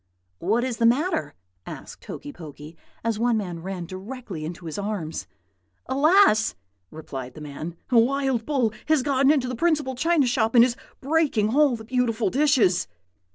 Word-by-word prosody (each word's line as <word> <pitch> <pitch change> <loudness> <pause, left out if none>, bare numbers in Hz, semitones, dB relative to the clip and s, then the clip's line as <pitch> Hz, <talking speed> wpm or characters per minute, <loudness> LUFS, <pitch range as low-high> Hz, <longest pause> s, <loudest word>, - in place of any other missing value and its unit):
"'What 220 +7 +1
is 250 -3 -2
the 230 - +4
matter?' 245 - 0 0.3
asked - - -9
Hokey 290 0 -8
Pokey, 155 - -11 0.3
as 225 -2 -1
one 235 -1 +2
man 175 -5 -4
ran 185 -1 -5
directly 190 -2 -7
into 170 +2 -7
his 160 +3 -5
arms. 180 - -4 0.6
"'Alas!' 280 - +4 0.3
replied 135 -5 -8
the - - -9
man. 155 +3 -7
'A 240 - +6
wild 265 0 +1
bull 250 -5 0
has 310 -4 +3
got 275 -1 +3
into 280 -4 +3
the 250 - -3
principal 295 -1 +1
china 315 +2 +2
shop, 235 -1 +1
and 235 0 +8
is 245 -1 -1 0.3
breaking 270 -7 +1
all 290 -4 +4
the 220 -1 -10
beautiful 235 -4 0
dishes.' 265 - +3
235 Hz, 160 wpm, -24 LUFS, 185-270 Hz, 0.6 s, and